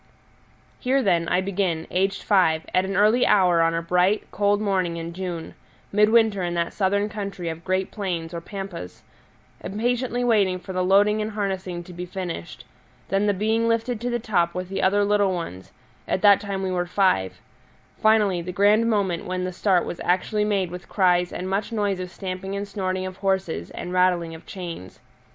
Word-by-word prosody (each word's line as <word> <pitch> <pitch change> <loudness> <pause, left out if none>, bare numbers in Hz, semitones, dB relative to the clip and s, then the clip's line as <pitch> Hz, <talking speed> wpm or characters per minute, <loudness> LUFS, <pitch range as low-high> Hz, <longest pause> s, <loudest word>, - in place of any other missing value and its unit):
Here, 265 +1 +1
then, 170 -5 +2
I 180 +2 +2
begin, 185 -4 -1
aged 195 +2 0
five, 165 -6 +3
at 185 +1 +3
an 195 +1 -3
early 215 +5 +4
hour 180 -4 +4
on 165 0 +2
a 165 - -2
bright, 180 +4 +2
cold 205 0 +2
morning 185 -5 0
in 165 0 -5
June 175 -2 -5 0.4
midwinter 210 -1 +4
in 175 -1 -2
that 170 0 -1
southern 200 +1 +1
country 200 -4 -5
of 165 +1 -7
great 185 +1 -1
plains 175 -5 -4
or 170 - -4
pampas; 190 - -8 0.6
impatiently 245 +4 -1
waiting 205 -6 +3
for 185 +1 -8
the 185 0 0
loading 205 +3 +4
and 215 - -2
harnessing 190 -4 -3
to 180 - -12
be 180 +1 -6
finished; 175 - -6 0.4
then 195 +2 +1
the 205 - +3
being 220 +3 +1
lifted 230 0 0
to 245 - -1
the 240 - 0
top 195 -7 0
with 180 0 -4
the 195 - -2
other 200 +2 +3
little 200 -2 +2
ones 95 - -7 0.4
at 190 - -1
that 200 -1 +7
time 195 -1 -3
we 190 - -1
were 175 -1 -1
five; 175 - +1 0.6
finally, 210 -5 +3
the 180 +2 -5
grand 210 +4 +3
moment 195 -6 0
when 185 0 -3
the 185 0 -3
start 185 -1 +2
was 175 - -6
actually 185 +4 +1
made 195 -4 0
with 180 +1 -9
cries 180 -2 +2
and 185 - -5
much 200 +4 -2
noise 205 -4 0
of 180 0 -5
stamping 190 +1 -5
and 200 0 -4
snorting 185 -2 -2
of 185 0 -7
horses 190 - -1
and 180 - -6
rattling 180 -2 +2
of 160 - -12
chains. 170 - -8
190 Hz, 190 wpm, -24 LUFS, 175-205 Hz, 0.6 s, that